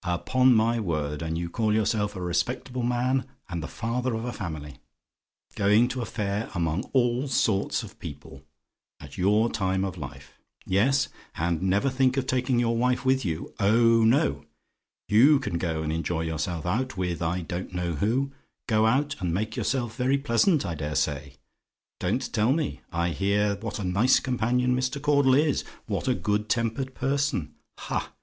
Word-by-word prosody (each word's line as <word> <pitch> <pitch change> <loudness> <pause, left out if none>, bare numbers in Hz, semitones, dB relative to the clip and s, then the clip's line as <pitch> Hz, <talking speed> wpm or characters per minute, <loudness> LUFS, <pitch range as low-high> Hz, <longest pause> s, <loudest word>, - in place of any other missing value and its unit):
Upon 125 +9 +3
my 115 +1 +2
word! 75 -6 -2
And 80 0 -2
you 85 0 -2
call 110 +5 0
yourself 105 -1 0
a 90 - -5
respectable 125 +8 -2
man, 125 +2 +1 0.3
and 85 -1 -3
the 80 - -5
father 120 +2 -2
of 115 +1 -4
a 125 - -3
family! 75 - -6 0.7
Going 105 +4 +4
to 125 0 -3
a - - -2
fair 105 0 -2
among 85 - -1
all 125 +1 +2
sorts 110 -6 +1
of - - -12
people, - - -9 0.6
at - - -11
your 105 +5 +3
time 95 -1 0
of 95 -2 -5
life. 70 -2 -10 0.3
Yes; 125 +9 +2 0.3
and 85 0 -1
never 95 +7 +2
think 130 0 +2
of 135 - 0
taking 130 -1 0
your 115 -1 +1
wife 125 +2 +1
with 130 0 +3
you. 80 -4 -4
Oh 115 +3 +4
no! 95 - +2 0.6
you 135 +8 +6
can 85 -11 -3
go 80 -3 -2
and 80 0 -2
enjoy 80 0 -1
yourself 80 +1 -3
out, 110 +4 -1
with 90 -2 -2
I 85 +2 -1
don't 85 +3 -5
know 90 -1 -2
who: 120 - 0 0.3
go 110 -1 +3
out, 140 +5 +1
and 90 -4 -1
make 110 +5 -2
yourself 120 -4 -1
very 130 +3 +2
pleasant, 140 - +2
I 85 - -2
dare 75 -1 -4
say. 70 -2 -1 0.6
Don't - - -1
tell 110 +5 +3
me; 155 -2 -2
I 85 0 0
hear 100 +4 +1
what 110 +1 -5
a 105 - -4
nice 100 +8 +3
companion 125 0 +1
Mr. 130 +3 -1
Caudle 140 -2 +4
is: 150 0 +2 0.2
what - - -3
a - - +3
good 105 +4 -1
tempered 120 +4 -1
person. 135 - -1 0.2
Ha! - - -4
110 Hz, 175 wpm, -26 LUFS, 90-125 Hz, 0.7 s, you